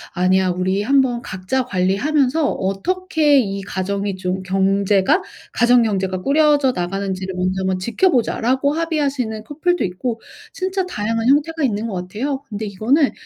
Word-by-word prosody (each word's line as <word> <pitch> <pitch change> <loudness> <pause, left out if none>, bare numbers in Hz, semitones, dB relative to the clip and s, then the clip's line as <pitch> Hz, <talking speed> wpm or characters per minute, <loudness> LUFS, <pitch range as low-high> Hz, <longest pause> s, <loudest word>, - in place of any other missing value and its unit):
"아니야. 185 +1 +2
우리 185 +2 0
한번 255 0 +2
각자 210 +7 -2
관리하면서 255 - +1
어떻게 305 - +1
이 200 -4 -2
가정이 200 +1 -3
좀 185 0 -3
경제가 195 - +2 0.3
가정 240 0 +4
경제가 190 -4 -1
꾸려져 290 -1 +3
나가는지를 190 +1 -3
먼저 185 +1 -1
한번 190 0 0
지켜보자."라고 260 - +1
합의하시는 285 -9 -2
커플도 330 +7 -1
있고 225 +6 -3 0.3
진짜 380 +1 -2
다양한 225 -5 -2
형태가 300 +4 +2
있는 220 -4 0
것 215 - -5
같아요. 215 +10 -3
근데 215 +1 -4
이거는 235 +9 +1
220 Hz, 350 characters per minute, -20 LUFS, 190-280 Hz, 0.3 s, 가정